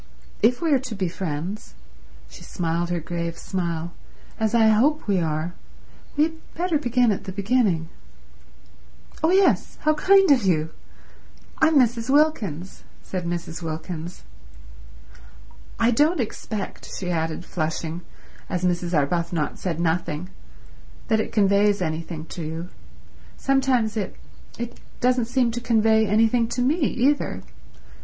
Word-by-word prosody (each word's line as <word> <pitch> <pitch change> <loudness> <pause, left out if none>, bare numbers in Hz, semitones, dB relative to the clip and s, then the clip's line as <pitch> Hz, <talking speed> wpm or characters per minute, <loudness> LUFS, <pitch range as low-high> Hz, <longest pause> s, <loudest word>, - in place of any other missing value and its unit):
If 245 +8 +3
we 325 - +2
are 270 - +4
to 250 -4 -6
be 190 -2 -1
friends"—she 175 +3 -7
smiled 170 0 -2
her 175 -1 0
grave 170 +1 -4
smile—"as 175 +5 -4
I 220 -1 +6
hope 275 +8 +3
we 195 -3 +2
are, 160 +1 -2 0.6
we 295 - +5
had 320 0 -5
better 340 -2 +1
begin 245 -3 +2
at 200 - -3
the 190 - -4
beginning." 200 -4 +1 1.3
"Oh 320 - +3
yes—how 365 -4 +3
kind 385 +2 +5
of 260 -5 +5
you. 160 -4 +1 0.9
I'm 315 0 +4
Mrs. 235 -2 +2
Wilkins," 220 - +1 0.2
said 180 -2 -4
Mrs. 170 -1 -4
Wilkins. 165 +1 -6 1.6
"I 230 +1 +4
don't 300 +8 +3
expect," 215 -3 -4
she 180 -2 -3
added, 165 +1 -2
flushing, 160 0 -3 0.5
as 180 -1 -2
Mrs. 175 -1 0
Arbuthnot 165 +1 -1
said 170 -3 -2
nothing, 170 0 -1 0.8
"that 220 -1 +3
it - - -2
conveys 200 0 +3
anything 160 -1 -3
to 175 - -6
you. 165 +3 -5 0.7
Sometimes 265 -5 +1
it—it 230 +3 -7 0.2
doesn't 250 -1 +2
seem 245 0 +1
to 240 +1 -4
convey 220 -2 +3
anything 225 +3 +3
to 245 +2 -1
me 285 +6 +2
either. 270 - +1
205 Hz, 125 wpm, -24 LUFS, 170-245 Hz, 1.6 s, I